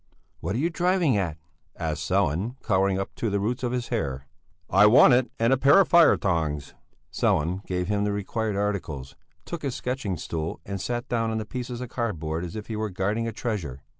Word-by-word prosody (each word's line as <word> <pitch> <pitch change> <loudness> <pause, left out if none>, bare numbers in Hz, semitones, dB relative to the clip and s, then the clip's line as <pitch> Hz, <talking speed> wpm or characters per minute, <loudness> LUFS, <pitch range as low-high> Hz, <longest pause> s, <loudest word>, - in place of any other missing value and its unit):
"What 100 - -3
are - - 0
you 165 +6 0
driving 175 - +2
at?" 85 -6 -1 0.4
asked - - -3
Sellén, 95 - +1
colouring 95 -2 +2
up 95 - -4
to 115 - -1
the 100 0 0
roots 120 +5 -1
of 125 -2 -1
his 125 -1 -3
hair. 70 - -2 0.4
"I 100 +3 +6
want 125 +4 +7
it, 125 0 +3
and 115 +3 +3
a - - +3
pair 140 +8 +6
of 195 - +4
fire 170 -1 +6
tongs." 80 -6 -1 0.4
Sellén 90 +6 +1
gave 90 -1 -1
him 105 0 0
the 105 - 0
required 105 +1 -2
articles, 85 -10 -3 0.3
took 170 -2 -5
his 135 -4 -3
sketching 125 -8 -3
stool 80 +1 -4
and 100 -1 -4
sat 120 +1 -3
down 115 -2 0
on 110 - -1
the 110 - -3
pieces 125 +1 -5
of 125 - -5
cardboard 85 -10 -3
as 90 +4 -6
if 105 -1 -5
he 110 - -5
were 110 0 -2
guarding 105 +5 -1
a - - -2
treasure. 85 - -4
105 Hz, 210 wpm, -26 LUFS, 90-120 Hz, 0.4 s, want